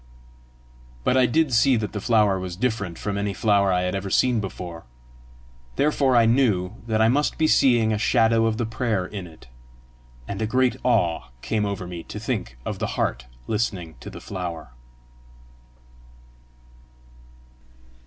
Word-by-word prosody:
But 125 - +2
I 130 -1 +5
did 155 +2 +1
see 125 +3 +4
that 110 -2 -2
the 105 - -4
flower 105 -4 +3
was 90 -1 -5
different 105 -5 -2
from 100 -1 -3
any 100 -1 -2
flower 100 -2 +3
I 90 -1 +2
had 90 - -1
ever 95 0 -3
seen 125 +3 +2
before; 90 - -7 0.9
therefore 140 -3 +2
I 115 -1 +6
knew 110 -6 +2
that 110 -1 0
I - - +5
must 145 +5 +1
be 160 - +2
seeing 120 -7 +4
a 105 - -1
shadow 115 -1 +3
of 110 -1 -1
the 120 - -1
prayer 110 -4 -1
in 95 -1 -7
it; 80 -6 -16 0.8
and 100 - -5
a 110 - 0
great 125 +2 +2
awe 85 -9 +1 0.2
came 105 -2 0
over 100 -2 -4
me 90 -1 -7
to - - -7
think - - -4
of - - -4
the - - -1
heart - - -1 0.2
listening 100 -7 -2
to - - -9
the - - -9
flower. 85 -8 -6
105 Hz, 160 wpm, -24 LUFS, 95-120 Hz, 0.9 s, I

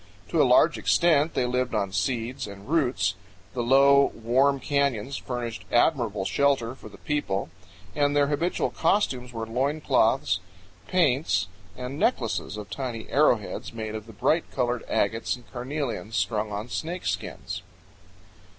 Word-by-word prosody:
To - - +3
a - - +4
large - - +5
extent 160 -2 +3
they 125 - +2
lived 125 -1 -1
on 100 -2 0
seeds 115 +5 -2
and 100 0 -11
roots. 135 - +1 0.4
The 125 - -2
low, 140 +3 +6
warm 130 +5 +2
canyons 140 -3 0
furnished 120 -2 -5
admirable 115 -7 +2
shelter 135 -3 +1
for 130 - -12
the - - -14
people, 100 - -2 0.4
and 145 -1 +2
their 145 -1 +4
habitual 150 +5 0
costumes 125 -12 0
were 115 -2 -4
loincloths, 125 - +1 0.5
paints, 130 - +2 0.3
and 125 +3 -5
necklaces 105 - 0
of 105 -1 -8
tiny 120 -5 -5
arrowheads 125 -9 +1
made 110 -1 -5
of 110 0 -6
the 115 - -11
bright 155 - +1
colored 125 -2 -1
agates 115 +5 0
and 125 -1 -16
carnelians 125 -3 -4
strung 105 -2 0
on 105 +3 -4
snakeskins. 165 +9 -4
125 Hz, 140 wpm, -26 LUFS, 110-140 Hz, 0.5 s, low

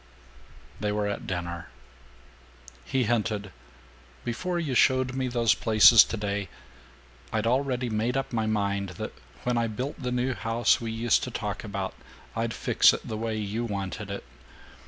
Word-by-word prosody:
VI - - -24
They - - +1
were 105 0 0
at 105 - -4
dinner. 85 -4 -4 1.2
He 130 -1 +1
hinted, 105 -3 -1 0.7
"Before 175 +10 -2
you 155 -6 -2
showed 130 +1 +3
me 130 0 -1
those 120 -2 +3
places 110 +1 +7
today, 100 -3 -3 0.8
I'd 110 0 0
already 125 0 +1
made 115 +3 0
up 135 -2 -3
my 110 -2 0
mind 100 -2 0
that - - -5 0.3
when 120 -1 +1
I 115 - +1
built 125 +7 -5
the 125 -1 -2
new 125 +1 0
house 115 +1 +2
we 115 -1 -3
used 115 0 +2
to - - -5
talk - - -4
about, - - -4 0.4
I'd 115 0 -1
fix - - +5
it - - -5
the 110 - -3
way 110 0 -2
you 105 +2 -2
wanted 100 -5 -4
it. - - -5
115 Hz, 160 wpm, -27 LUFS, 105-125 Hz, 1.2 s, places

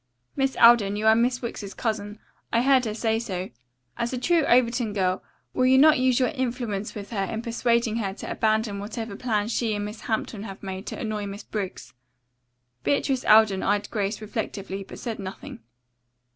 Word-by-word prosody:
Miss 270 -1 0
Alden, 230 -4 +6
you 210 +1 -2
are 220 - +7
Miss 245 +2 +1
Wicks's 205 -4 -6
cousin. 210 -2 -3 0.3
I 230 +1 +2
heard 265 -2 +4
her 215 - -2
say 225 0 0
so. 190 -5 -4 0.5
As 235 0 -1
a 255 - -2
true 330 +6 +2
Overton 235 -2 +2
girl, 185 -2 0 0.3
will 255 0 +2
you 260 +1 +6
not 305 +2 +6
use 255 -1 +3
your 255 - +2
influence 240 -6 -3
with 205 0 -7
her 200 -4 -1
in 220 +4 -4
persuading 235 -1 +1
her 200 -4 -1
to - - -7
abandon 215 -2 0
whatever 220 +1 -5
plan 215 -2 -1
she 225 -1 0
and 205 0 -3
Miss 210 +2 -7
Hampton 220 -1 -3
have 200 -2 -8
made 190 +1 -6
to - - -5
annoy 215 -5 -3
Miss 200 +1 -7
Briggs?" 200 -4 -5 0.9
Beatrice 270 -2 +1
Alden 215 -3 +6
eyed 205 +1 0
Grace 205 0 -2
reflectively 200 -2 -4
but - - -11
said 230 -3 -5
nothing. 190 -9 -8
220 Hz, 185 wpm, -25 LUFS, 205-240 Hz, 0.9 s, are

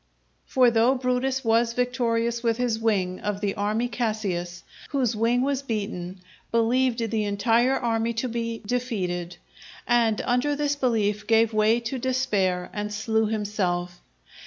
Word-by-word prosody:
For 250 -2 +4
though 235 +3 +3
Brutus 255 +1 -1
was 230 +1 +3
victorious 235 -2 0
with 230 -1 +1
his 245 -3 0
wing 195 -5 0
of 210 -1 -3
the 205 -1 -1
army 215 +4 -1
Cassius, 200 -8 -3 0.3
whose 255 -6 0
wing 235 +3 +2
was 275 -1 0
beaten, 200 -7 -4 0.3
believed 230 0 +1
the 220 -2 0
entire 230 +5 +2
army 230 -1 0
to 235 +3 -2
be 230 -1 -4
defeated, 185 -8 -2 0.5
and 230 -3 +3
under 250 +4 +1
this 290 0 0
belief 215 -6 0
gave 225 0 +3
way 215 +2 +3
to 235 +3 -4
despair 210 -9 0
and 210 0 -3
slew 220 +1 0
himself. 185 -5 -2
230 Hz, 140 wpm, -25 LUFS, 210-245 Hz, 0.5 s, For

